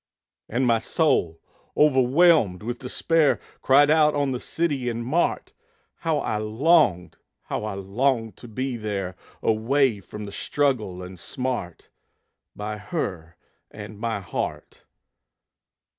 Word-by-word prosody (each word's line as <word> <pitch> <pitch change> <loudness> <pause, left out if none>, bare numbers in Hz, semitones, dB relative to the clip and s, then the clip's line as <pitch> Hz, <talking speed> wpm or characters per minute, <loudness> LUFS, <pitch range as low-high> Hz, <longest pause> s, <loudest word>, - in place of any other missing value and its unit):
And 125 +4 0
my 115 -2 +3
soul, 110 - +1 0.4
overwhelmed 135 - +4
with 120 +2 -4
despair, 155 +4 +1 0.2
Cried 145 +2 +5
out 150 -1 +4
on 140 -2 +1
the 125 - -2
city 145 -6 -1
and 115 0 -4
mart! 160 +8 0 0.4
How - - 0
I 105 - -1
longed, 110 - +2 0.3
how - - -4
I 105 -2 -4
longed 115 +2 0
to 120 - -11
be 130 +2 -3
there, 100 -4 -4 0.3
Away 115 +1 +2
from 105 +2 -8
the 100 - -8
struggle 110 -10 -1
and 90 0 -10
smart, 125 -7 -4 0.7
By 105 +1 -5
her 85 -5 -4 0.3
and 105 0 -10
my 110 -2 -2
heart! 90 - -5
115 Hz, 125 wpm, -24 LUFS, 105-140 Hz, 0.7 s, Cried